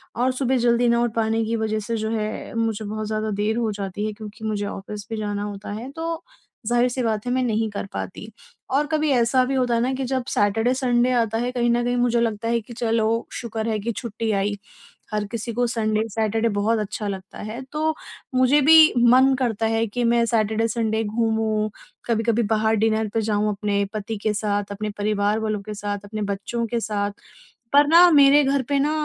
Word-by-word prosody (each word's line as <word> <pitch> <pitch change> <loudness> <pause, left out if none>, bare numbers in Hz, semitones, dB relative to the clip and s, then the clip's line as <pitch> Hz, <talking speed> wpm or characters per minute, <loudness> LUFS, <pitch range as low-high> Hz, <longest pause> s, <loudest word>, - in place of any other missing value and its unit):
और 250 +2 +1
सुबह 260 0 0
जल्दी 240 0 +3
ना 235 0 +3
उठ 240 -2 -1
पाने 225 0 +1
की 225 +1 -1
वज़ह 220 -1 -1
से, 225 +2 -3
जो 220 0 -2
है, 215 0 -4
मुझे 225 -1 -1
बहुत 215 +1 -4
ज़्यादा 215 0 -2
देर 220 +2 0
हो 230 -2 0
जाती 200 0 -4
है, 215 - -3
क्योंकि 215 +1 -9
मुझे 210 -1 -1
ऑफ़िस 205 +1 -7
भी 225 - -3
जाना 205 -1 -3
होता 205 0 -6
है। 255 +3 -7
तो 330 +2 -4 0.4
ज़ाहिर-सी 240 +2 +1
बात 220 -1 -1
है, 245 - -1
मैं 255 - +1
नहीं 220 -2 0
कर 200 - -4
पाती 210 +3 -6 0.4
और 285 +3 +1
कभी 310 -1 0
ऐसा 250 0 +3
भी 270 +1 -1
होता 250 -2 +1
है 230 - +1
ना 255 +2 0
कि 265 +1 -3
जब 260 0 -1
सैटरडे-संडे 240 +4 +2
आता 225 -1 0
है, 245 +2 -1
कहीं 240 -1 0
न 240 0 +1
कहीं 245 +1 0
मुझे 240 -1 +2
लगता 225 -1 -1
है 235 0 +1
कि 230 +3 -12
चलो, 230 -1 0
शुक्र 225 -2 -4
है 220 -1 0
कि 230 +3 -2
छुट्टी 225 0 -3
आई। 205 0 0 0.6
हर 210 -1 0
किसी 230 0 -4
को 245 +2 +1
संडे-सैटरडे 220 0 0
बहुत 220 +2 +1
अच्छा 210 0 -4
लगता 195 -1 -6
है। 235 +4 -6
तो 310 +1 0 0.4
मुझे 255 +3 +4
भी 315 +2 +7
मन 255 +3 +5
करता 225 -4 0
है 225 0 +1
कि 245 +4 -3
मैं 235 0 +3
सैटरडे-संडे 225 0 0
घूमूँ, 220 -1 0 0.4
कभी-कभी 230 0 +1
बाहर 220 0 +2
डिनर 220 0 +1
पे 225 - +1
जाऊँ, 210 -1 0
अपने 200 0 -1
पति 215 +1 -4
के 215 - +1
साथ, 205 -1 -2
अपने 210 +1 -4
परिवार 205 0 0
वालों 215 -2 -2
के 210 +2 -7
साथ, 205 0 -4
अपने 215 +1 -5
बच्चों 230 +4 -3
के 235 +1 -1
साथ। 205 -2 -2 0.6
पर 290 +1 +6
ना, 340 +3 +7
मेरे 285 -1 +6
घर 275 0 +1
पे 285 - +2
ना, 290 +2 +1
225 Hz, 205 wpm, -23 LUFS, 215-245 Hz, 0.6 s, भी